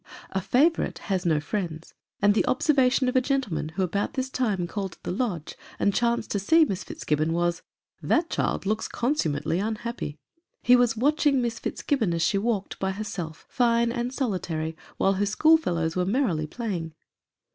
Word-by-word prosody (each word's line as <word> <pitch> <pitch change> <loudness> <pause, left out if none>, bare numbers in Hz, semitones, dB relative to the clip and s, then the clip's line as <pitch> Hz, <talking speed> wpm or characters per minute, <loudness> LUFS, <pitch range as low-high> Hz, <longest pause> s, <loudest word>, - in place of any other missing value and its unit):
A 190 - -1
favorite 300 - +2 0.2
has 185 -1 0
no 155 -2 +3
friends; 165 0 -4 0.3
and 205 0 +6
the 215 - +2
observation 265 -2 +3
of 250 - -1
a 255 - +5
gentle 270 - -1
man, 155 0 -2
who 190 +4 -2
about 200 +3 -1
this 260 0 -2
time 210 -10 0
called 195 0 -4
at - - -22
the - - -3
Lodge 185 -6 -2 0.2
and 200 - +2
chanced 235 0 0
to 200 - 0
see 320 - +5
Miss 190 -9 -3
Fitzgibbon, 155 +2 -1
was, 175 0 0 0.2
" - - -50
That 330 +1 +3
child - - -1
looks 215 +2 0
consummately 165 - 0
unhappy:" 220 -6 -3 0.5
he 250 - +7
was 245 -2 +3
watching 290 +2 +3
Miss 235 -2 -2
Fitzgibbon, 220 -12 -1
as 165 - 0
she 195 +3 +2
walked, 210 -2 -2
by 190 0 -1
herself, 180 -6 -6
fine 235 -1 +2
and 240 0 -2
solitary, 175 - -2 0.2
while 195 - +3
her 200 +1 0
schoolfellows 200 - +3
were 180 - +1
merrily 185 - 0
playing. 175 -6 -4
205 Hz, 180 wpm, -26 LUFS, 175-250 Hz, 0.5 s, he